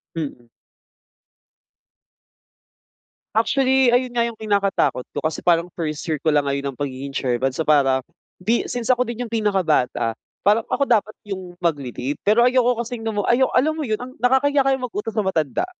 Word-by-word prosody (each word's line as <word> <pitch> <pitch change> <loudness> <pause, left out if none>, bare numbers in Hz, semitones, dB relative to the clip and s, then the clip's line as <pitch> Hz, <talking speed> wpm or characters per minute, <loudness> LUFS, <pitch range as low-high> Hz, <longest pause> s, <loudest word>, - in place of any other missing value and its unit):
Mm. 140 -7 -5 2.9
Actually 260 +2 +3
ayun 245 0 +1
nga 235 - +3
yung 235 -2 -4
kinakatakot 200 - +1
ko - - -3
kasi 155 +1 -3
parang 170 0 +3
first 155 -3 -3
year 160 - +1
ko 155 - +3
lang 145 -1 +2
ngayon 140 0 -1
ng 125 - -19
pagiging 140 0 -4
chairman. 130 -1 0
So 155 +5 -4
para, 135 -3 +4 0.4
di 225 +6 +1
since 240 -2 -4
ako 250 -1 +3
din 240 0 -5
yung - - -18
pinakabata 175 - +1 0.3
parang 215 +2 +4
ako 280 - +1
dapat 215 -4 +1
yung 185 -3 -7
magle-lead 145 -5 -2
pero 220 +4 +4
ayoko 250 -1 +3
kasing 240 -1 -6
lam 220 -2 -3
mu, 205 - 0
alam 260 +4 +3
mo 315 - -4
yun 220 -6 -1
ang 255 +2 -8
nakakahiya 275 +3 +3
kayang 265 -1 +1
mag-utos 225 -1 -4
ng 210 - +1
matanda. 160 - 0
205 Hz, 165 wpm, -22 LUFS, 150-245 Hz, 2.9 s, para